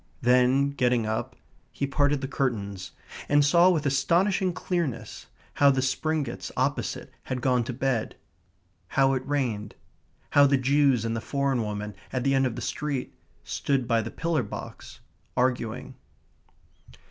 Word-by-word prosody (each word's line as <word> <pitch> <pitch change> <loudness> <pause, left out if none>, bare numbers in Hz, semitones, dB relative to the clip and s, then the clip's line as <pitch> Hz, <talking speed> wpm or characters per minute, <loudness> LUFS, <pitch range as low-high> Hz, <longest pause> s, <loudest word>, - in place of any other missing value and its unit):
Then, 125 +3 +4
getting 125 -4 +1
up, 110 +1 -3 0.4
he 140 - -2
parted 145 0 +1
the 135 - -3
curtains, 100 -10 -3 0.4
and 145 0 +5
saw, 170 +5 +6
with 160 -5 +1
astonishing 170 +8 +2
clearness, 170 -7 -3 0.3
how 140 - +5
the 135 -1 +2
Springetts 140 -1 -2
opposite - - -2
had 130 - -3
gone 125 -1 +2
to 130 - -3
bed; 125 -2 -1 0.8
how 135 0 +5
it 130 -1 -1
rained; 120 -8 -2 0.6
how 145 0 +6
the 140 0 +3
Jews 135 -3 +3
and 115 0 -1
the 115 - -3
foreign 140 -1 0
woman, 105 -1 -4 0.2
at 130 -2 -2
the 135 +1 +2
end 135 -1 +3
of 120 - -5
the 120 - -5
street, 140 0 -3 0.3
stood 135 -4 -1
by 115 -1 +2
the 110 - -5
pillar 165 +1 -1
box, - - -9 0.4
arguing. 125 0 -1
135 Hz, 145 wpm, -26 LUFS, 120-145 Hz, 0.8 s, saw